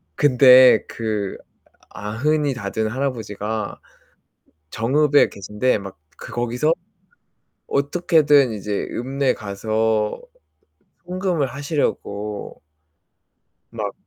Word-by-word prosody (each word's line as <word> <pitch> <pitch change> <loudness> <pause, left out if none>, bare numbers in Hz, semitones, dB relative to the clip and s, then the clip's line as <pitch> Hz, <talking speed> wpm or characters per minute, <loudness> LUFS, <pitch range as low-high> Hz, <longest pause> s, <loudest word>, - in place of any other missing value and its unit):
근데 130 -2 +6
그 105 -3 -3 0.5
아흔이 140 +8 -1
다 100 -5 -5
된 110 +1 -1
할아버지가 110 -4 -4 0.9
정읍에 145 +6 +3
계신데 105 +5 -1
막 95 -4 -10 0.2
그 - - -9
거기서 120 +6 0 0.9
어떻게든 145 -3 +3
이제 105 -1 -3
읍내에 135 +2 -1
가서 110 +1 -1 0.9
송금을 180 -4 -1
하시려고. 120 -7 -4 1.1
막. - - -4
120 Hz, 185 characters per minute, -21 LUFS, 105-140 Hz, 1.1 s, 근데